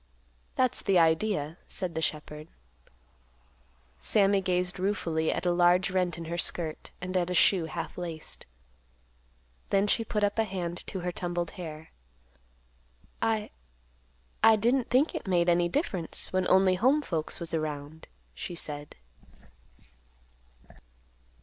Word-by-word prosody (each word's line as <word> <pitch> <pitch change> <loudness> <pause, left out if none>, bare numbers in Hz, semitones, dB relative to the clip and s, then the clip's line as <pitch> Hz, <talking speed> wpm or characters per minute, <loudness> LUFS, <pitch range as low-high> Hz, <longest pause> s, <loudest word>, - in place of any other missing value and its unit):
"That's 255 -1 +2
the 195 -3 +3
idea," 165 -1 +2
said 185 -3 -3
the 160 - -2
shepherd. 150 0 -3 1.5
Sammy 200 -2 +3
gazed 180 0 -1
ruefully 170 -5 0
at 180 - -3
a 175 - +3
large 175 +2 +4
rent 180 -2 0
in 165 - -6
her 170 +2 -3
skirt, 160 -2 -2
and 185 +1 -5
at 180 -1 +1
a 180 - -1
shoe 180 -1 +4
half 165 +2 -5
laced. 165 -3 -6 1.2
Then 195 0 +3
she 225 +2 +2
put 210 -1 -2
up 205 +2 +1
a - - +5
hand 180 -4 -4
to 190 - -4
her 180 0 -2
tumbled 175 -1 -3
hair. 160 -3 -8 1.3
"I—I 60 - -1
didn't 240 +4 +1
think 265 +6 +3
it - - -5
made 175 -2 +2
any 175 0 +3
difference, 190 - -2
when 185 0 +1
only 190 0 +5
home 280 +5 +4
folks 160 - -3
was 170 -1 -4
around," 155 -1 -4 0.3
she 175 - -6
said. 145 -2 -5
175 Hz, 130 wpm, -29 LUFS, 160-195 Hz, 1.5 s, a